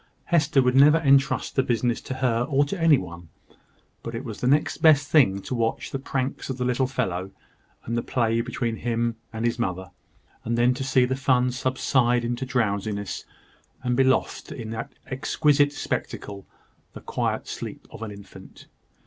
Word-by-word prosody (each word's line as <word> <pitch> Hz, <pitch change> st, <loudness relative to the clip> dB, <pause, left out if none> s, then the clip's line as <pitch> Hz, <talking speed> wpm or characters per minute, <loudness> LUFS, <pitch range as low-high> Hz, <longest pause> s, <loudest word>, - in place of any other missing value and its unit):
Hester 150 Hz, -4 st, +4 dB
would 125 Hz, 0 st, +2 dB
never 145 Hz, +4 st, +7 dB
entrust 140 Hz, -3 st, +2 dB
the 135 Hz, -, +4 dB
business 120 Hz, -1 st, 0 dB
to 130 Hz, -, -6 dB
her 125 Hz, -3 st, +1 dB
or 140 Hz, 0 st, +3 dB
to 170 Hz, +5 st, -5 dB
any 160 Hz, -3 st, +6 dB
one: 85 Hz, -4 st, -8 dB, 0.7 s
but 115 Hz, -, -6 dB
it 120 Hz, +4 st, -5 dB
was 110 Hz, -4 st, -7 dB
the 125 Hz, -, 0 dB
next 145 Hz, +3 st, +2 dB
best 145 Hz, -3 st, +5 dB
thing 100 Hz, -11 st, +4 dB
to -, -, -5 dB
watch 115 Hz, -2 st, -1 dB
the 135 Hz, -, -3 dB
pranks 135 Hz, 0 st, -3 dB
of 130 Hz, -, -3 dB
the 125 Hz, -, -2 dB
little 125 Hz, +1 st, +1 dB
fellow, 95 Hz, -8 st, -2 dB, 0.6 s
and 115 Hz, -, -2 dB
the 120 Hz, -, 0 dB
play 115 Hz, -2 st, 0 dB
between 115 Hz, -1 st, -3 dB
him 115 Hz, 0 st, -1 dB
and 110 Hz, +1 st, -3 dB
his 120 Hz, 0 st, 0 dB
mother; 95 Hz, -4 st, -3 dB, 0.5 s
and 115 Hz, +1 st, -1 dB
then 120 Hz, +1 st, +4 dB
to 125 Hz, -, -4 dB
see 130 Hz, -1 st, +3 dB
the 130 Hz, +1 st, -1 dB
fun 130 Hz, -2 st, +2 dB
subside 125 Hz, -1 st, +1 dB
into 120 Hz, +2 st, -3 dB
drowsiness, 100 Hz, -4 st, -2 dB, 0.6 s
and 125 Hz, -1 st, 0 dB
be 135 Hz, -, +4 dB
lost 130 Hz, 0 st, 0 dB
in 115 Hz, -4 st, -6 dB
that 115 Hz, 0 st, -5 dB
exquisite 145 Hz, +2 st, +2 dB
spectacle, 100 Hz, -7 st, -5 dB, 0.5 s
the -, -, -10 dB
quiet -, -, -2 dB
sleep -, -, -7 dB
of -, -, -11 dB
an 115 Hz, -, -4 dB
infant. 100 Hz, -2 st, -13 dB
125 Hz, 180 wpm, -25 LUFS, 115-135 Hz, 0.7 s, never